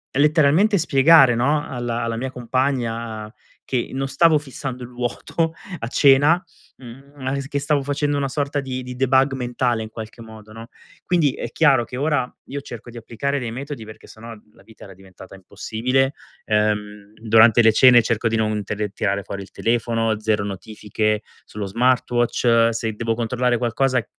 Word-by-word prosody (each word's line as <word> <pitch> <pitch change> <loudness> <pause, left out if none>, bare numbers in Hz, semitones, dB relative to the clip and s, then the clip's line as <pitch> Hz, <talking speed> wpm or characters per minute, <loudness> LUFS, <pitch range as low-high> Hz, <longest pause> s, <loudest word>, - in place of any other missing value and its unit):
letteralmente 155 +8 +3
spiegare, 140 -4 +5
no, 145 +5 +1
alla 120 -2 -3
alla 115 0 -2
mia 130 +2 -4
compagna 115 -4 -2 0.3
che 125 -3 -2
non 135 +1 -2
stavo 155 +3 +4
fissando 135 -3 -6
il 120 - -9
vuoto 125 +6 -3 0.3
a 115 - -4
cena, 145 +7 +4 0.3
mhmm, 135 +3 -13
ma 130 -2 -4
che 140 +1 -3
stavo 145 0 0
facendo 145 +1 -1
una 140 -1 -1
sorta 145 +1 -2
di 130 -2 -5
di 125 0 -8
debug 135 +1 +2
mentale, 120 -2 -1
in 110 - -8
qualche 110 +1 -9
modo, 110 -1 -13
no, 115 +1 -10 0.4
quindi, 165 -6 +2
è - - -6
chiaro 140 -6 +3
che 125 - -9
ora 140 -3 0 0.2
io 140 - -5
cerco 120 -3 -10
di 120 - -11
applicare 120 +5 -3
dei 120 -3 -5
metodi 135 -1 -7
perché 110 0 -13
se - - -15
no, 115 -1 -10
la - - -21
vita 110 - -17
era 95 - -12
diventata 95 0 -15
impossibile. 120 +8 -1 0.3
Ehm, 105 -1 -1
durante 115 +1 +5
le 110 - +6
cene 120 0 +6
cerco 115 0 0
di 115 - 0
non 110 -1 -1
tele 105 +1 -3
tirare 100 0 -2
fuori 100 0 -7
il - - -16
telefono, 115 -1 -1
0 110 -1 0
notifiche 105 +1 -3 0.2
sullo 105 -1 -6
smartwatch, 120 +1 +2
se 110 -1 -3
devo 115 +1 -2
controllare 120 +1 0
qualcosa 125 +1 0
120 Hz, 170 wpm, -21 LUFS, 110-135 Hz, 0.4 s, le